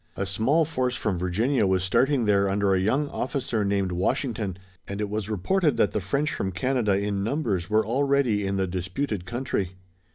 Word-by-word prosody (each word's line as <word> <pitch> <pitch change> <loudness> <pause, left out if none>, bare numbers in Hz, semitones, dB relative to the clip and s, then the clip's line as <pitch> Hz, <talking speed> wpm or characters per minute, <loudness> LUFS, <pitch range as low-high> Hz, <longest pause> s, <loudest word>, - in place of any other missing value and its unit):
A 100 - -1
small 135 - +2
force 130 -5 -1
from 100 -7 -1
Virginia 105 +7 +1
was 95 -1 +1
starting 130 +7 +2
there 100 -1 +3
under 100 0 +2
a 95 - +3
young 130 +10 +1
officer 125 -5 -2
named 100 -2 0
Washington, 105 +1 -1 0.3
and 100 +1 -5
it 105 -1 -2
was 105 -1 -3
reported 150 - +1
that - - +3
the 105 - -1
French 140 - -1
from 95 - -2
Canada 115 +1 +1
in 100 -1 -1
numbers 105 - -1
were 110 +1 +3
already 130 -4 +1
in 100 - -1
the 95 -1 +1
disputed 95 +3 -3
country. 120 -7 -2
105 Hz, 185 wpm, -26 LUFS, 95-130 Hz, 0.3 s, there